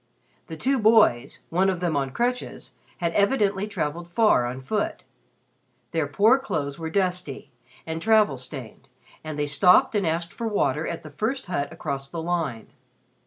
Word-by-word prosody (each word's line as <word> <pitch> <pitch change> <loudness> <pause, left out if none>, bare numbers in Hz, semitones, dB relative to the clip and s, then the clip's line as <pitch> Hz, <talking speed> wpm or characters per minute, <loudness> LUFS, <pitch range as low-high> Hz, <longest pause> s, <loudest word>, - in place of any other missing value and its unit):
The 160 - -7
two 265 - +1
boys 215 - +3
one 185 +3 +3
of 185 -2 -1
them 175 -3 -1
on 135 -1 0
crutches 245 - -3 0.3
had 170 -2 -1
evidently 205 -2 +2
traveled 170 -3 -4
far 175 - +3
on 125 +2 -5
foot. 210 +11 -2 0.9
Their 160 -3 0
poor 210 - +4
clothes 150 - -3
were 160 -1 -4
dusty 180 -6 -2 0.3
and 160 0 -4
travel 215 -10 +3
stained, 125 -1 -9 0.4
and 155 -1 -6
they 150 - 0
stopped 180 - +4
and 200 -5 +1
asked 170 +3 -2
for 230 - -4
water 160 -8 0
at 170 - -5
the 155 - -10
first 230 - -2
hut 160 -6 -2
across 140 -4 -5
the 170 - -5
line. 160 -10 -2
170 Hz, 165 wpm, -25 LUFS, 145-210 Hz, 0.9 s, poor